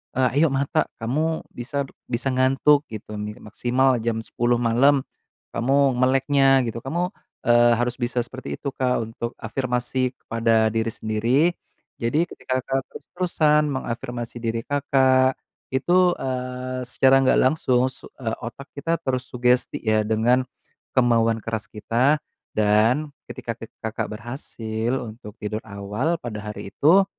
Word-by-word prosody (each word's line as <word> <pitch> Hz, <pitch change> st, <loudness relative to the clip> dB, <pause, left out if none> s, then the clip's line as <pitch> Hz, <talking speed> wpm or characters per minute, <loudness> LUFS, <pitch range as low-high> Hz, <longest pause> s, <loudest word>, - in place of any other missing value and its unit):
eee, 130 Hz, +2 st, +2 dB
"Ayo 165 Hz, -, +6 dB
mata 135 Hz, +1 st, +1 dB
kamu 155 Hz, +8 st, 0 dB
bisa 140 Hz, +4 st, -3 dB, 0.3 s
bisa 125 Hz, +2 st, -1 dB
ngantuk," 135 Hz, +3 st, +4 dB
gitu 105 Hz, -1 st, -7 dB
nih, 105 Hz, 0 st, -5 dB
"maksimal 125 Hz, +4 st, +1 dB
jam 115 Hz, -1 st, 0 dB
10 120 Hz, +1 st, 0 dB
malam 130 Hz, +5 st, +4 dB, 0.5 s
kamu 135 Hz, +1 st, +3 dB
meleknya," 135 Hz, +1 st, +4 dB
gitu. 115 Hz, -, -6 dB
Kamu, 175 Hz, +6 st, -1 dB, 0.4 s
eee, 120 Hz, 0 st, +6 dB
harus 120 Hz, 0 st, 0 dB
bisa 120 Hz, +1 st, -1 dB
seperti 130 Hz, +1 st, -7 dB
itu, 140 Hz, -, -3 dB
Kak, 125 Hz, -2 st, +1 dB
untuk 115 Hz, +1 st, -5 dB
afirmasi 125 Hz, +2 st, -1 dB
kepada 115 Hz, -1 st, +2 dB
diri 115 Hz, 0 st, 0 dB
sendiri. 110 Hz, +5 st, +1 dB, 0.6 s
Jadi 145 Hz, +9 st, +2 dB
ketika 130 Hz, 0 st, -3 dB
Kakak 135 Hz, +1 st, 0 dB
terus-terusan 155 Hz, -4 st, +1 dB
mengafirmasi 120 Hz, -2 st, -4 dB
diri 115 Hz, 0 st, -1 dB
Kakak 130 Hz, -2 st, +3 dB, 0.4 s
itu, 180 Hz, +6 st, +4 dB
eee, 130 Hz, 0 st, -3 dB
secara 135 Hz, +1 st, +4 dB
nggak 130 Hz, -, +4 dB
langsung 130 Hz, -2 st, +2 dB
su -, -, -13 dB
eee, 115 Hz, -3 st, -2 dB
otak 130 Hz, +4 st, -7 dB
kita 165 Hz, +4 st, 0 dB
terus 130 Hz, -1 st, -1 dB
sugesti 125 Hz, 0 st, +1 dB
ya 110 Hz, -1 st, +2 dB
dengan 120 Hz, +4 st, +3 dB, 0.5 s
kemauan 115 Hz, -2 st, +3 dB
keras 110 Hz, -2 st, -3 dB
kita. 125 Hz, +7 st, +2 dB, 0.4 s
Dan 110 Hz, +8 st, +3 dB, 0.2 s
ketika 120 Hz, -3 st, -5 dB
ke 115 Hz, -, -9 dB, 0.2 s
Kakak 110 Hz, 0 st, -2 dB
berhasil 115 Hz, -1 st, -4 dB
untuk 110 Hz, -2 st, -9 dB
tidur 105 Hz, +1 st, -3 dB
awal 105 Hz, +11 st, -2 dB
pada 110 Hz, -3 st, -5 dB
hari 105 Hz, -, -8 dB
itu, 185 Hz, +7 st, +5 dB
125 Hz, 135 wpm, -23 LUFS, 115-135 Hz, 0.6 s, Ayo